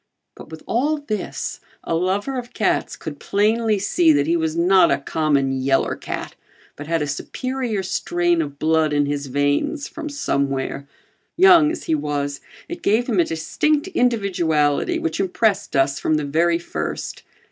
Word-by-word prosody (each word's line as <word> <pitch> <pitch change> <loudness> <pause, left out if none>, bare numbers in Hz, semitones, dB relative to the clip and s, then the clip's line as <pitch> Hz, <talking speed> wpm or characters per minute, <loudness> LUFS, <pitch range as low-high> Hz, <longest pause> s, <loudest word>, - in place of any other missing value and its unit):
But - - -13
with 160 0 -10
all 290 +6 0
this, 250 -8 -4 0.2
a - - -3
lover 190 +9 0
of 245 0 -10
cats 215 - 0
could 145 -3 -7
plainly 215 +1 +1
see 175 -4 +3
that 145 -1 +2
he 165 +3 +1
was 160 -1 -1
not 185 +2 +5
a - - +2
common 140 -2 0
"yeller 135 0 +1
cat" - - -6 0.4
but 145 - -9
had 165 -2 0
a - - -3
superior 240 - -3
strain 175 -2 0
of 145 -2 -5
blood 155 0 +2
in 145 0 +2
his 140 0 -3
veins 145 - 0
from 320 -2 -7
somewhere. 140 - -2 0.5
Young 345 -4 +7
as 325 - -4
he - - -1
was, 145 -2 -2 0.3
it 345 - -7
gave 220 +4 +2
him 225 -7 0
a - - +6
distinct 295 - 0
individuality 195 - +1
which 330 -1 -3
impressed 195 -1 0
us 135 +1 +2
from 155 - +1
the 150 -1 -1
very 165 +4 +2
first. 80 - -5
170 Hz, 165 wpm, -21 LUFS, 145-230 Hz, 0.5 s, Young